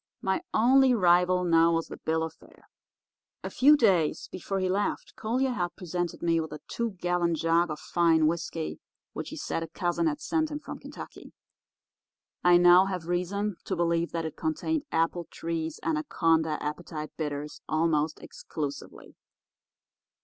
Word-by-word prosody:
My 190 0 0
only 255 +3 +5
rival 180 -2 +4
now 165 -1 +4
was 165 0 0
the - - -7
bill 160 0 -1
of 160 -1 -4
fare. - - -21 0.8
A - - -5
few 295 +3 +6
days 185 - +2
before 195 +1 -3
he 185 - 0
left 195 +3 -1
Collier 255 +4 0
had 175 -7 -2
presented 175 -1 -4
me 165 -1 +2
with 160 - -6
a 150 - -7
two 235 -2 -3
gallon 175 -2 0
jug 165 +2 +2
of 155 - -4
fine 165 -2 +2
whisky 165 0 -2 0.3
which - - -5
he - - -7
said - - -3
a 165 - -4
cousin 175 - -1
had 300 -2 -1
sent 315 +1 0
him 295 - -4
from - - -8
Kentucky. - - -10 1.1
I 175 0 +7
now 175 +1 +7
have 185 -4 -4
reason 180 +3 -2
to 190 - -2
believe 170 -1 0
that 165 -1 -2
it 160 -1 -5
contained 290 - -2
Appletree's 165 -1 -2
Anaconda 165 - +1
Appetite 155 0 -5
Bitters 150 -1 -5
almost 155 -1 +1
exclusively. 145 -3 -7
175 Hz, 155 wpm, -28 LUFS, 160-195 Hz, 1.1 s, I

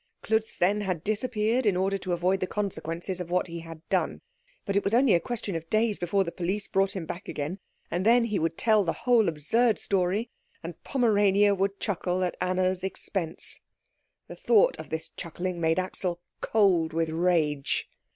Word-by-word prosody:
Klutz, 220 0 0
then, 200 +4 +2
had 185 -5 -2
disappeared 220 +2 0
in 190 -3 +3
order 195 +1 0
to 185 - -4
avoid 180 +2 +1
the 185 - -1
consequences 180 -2 -3
of 175 - -6
what 180 +1 +1
he 170 -1 -7
had 165 -1 -11
done; - - 0 0.5
but 200 - -2
it 200 - +2
was 200 +3 +1
only 255 -2 +5
a 170 - +5
question 210 -1 -4
of 165 0 -5
days 215 -1 +2
before 195 +3 +1
the 170 - -5
police 190 +4 -2
brought 195 +1 +1
him 180 -4 -4
back 175 +4 -7
again, 155 +7 -4 0.3
and 175 +2 -1
then 235 +3 +5
he 215 -4 -1
would 165 +1 -1
tell 215 -2 +3
the 165 - -1
whole 235 -6 +5
absurd 215 +10 +1
story, 195 +4 0 0.3
and 165 -1 -8
Pomerania 205 -5 +3
would 195 +1 -1
chuckle 185 -2 -1
at 180 - -1
Anna's 185 0 0
expense. 190 -3 -4 0.7
The - - -9
thought 475 +2 +4
of - - -8
this 160 +1 -4
chuckling 175 +1 -5
made 160 +1 +2
Axel 185 -1 -2 0.2
cold 185 -7 +2
with 165 0 0
rage. 160 -4 0
185 Hz, 185 wpm, -27 LUFS, 170-210 Hz, 0.7 s, only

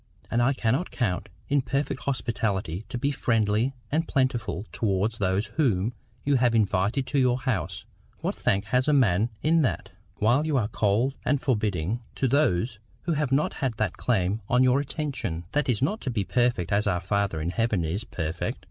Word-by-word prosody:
And 120 - +2
I 130 +3 +3
cannot 130 +7 0
count 105 -4 -2 0.2
it 140 -1 +2
perfect 135 +1 -2
hospitality 105 - -1
to - - -3
be 140 +4 0
friendly 115 0 +1 0.2
and 160 +3 +1
plentiful 120 - 0
towards 105 +1 0
those 95 +1 +1
whom 115 - +2 0.3
you 140 -1 +3
have 120 -2 +3
invited 105 +4 +2
to 140 +2 0
your 125 -1 +3
house—what 105 - -4
thank 100 - 0
has 125 +6 +1
a 150 - +4
man 110 -5 +3
in 160 +2 +4
that?—while 120 - 0
you 150 -3 +2
are 110 -4 0
cold 110 +5 +1
and 145 - +2
forbidding 105 - 0
to 135 - +1
those 120 -5 +1 0.2
who 170 - 0
have 150 -3 0
not 140 +3 +2 0.2
that 110 -2 0
claim 105 -2 0
on 125 +1 +4
your 130 +1 +4
attention. 135 - -3
That 145 -2 0
is 120 0 +1
not 210 +10 0
to 135 - -3
be 110 -5 0
perfect 120 -6 +1
as 105 +1 +2
our 90 -3 +1
Father 100 -2 0
in 80 +3 -2
heaven 110 -2 +1
is 85 +7 -2
perfect. 80 -5 -3
115 Hz, 175 wpm, -26 LUFS, 100-135 Hz, 0.3 s, a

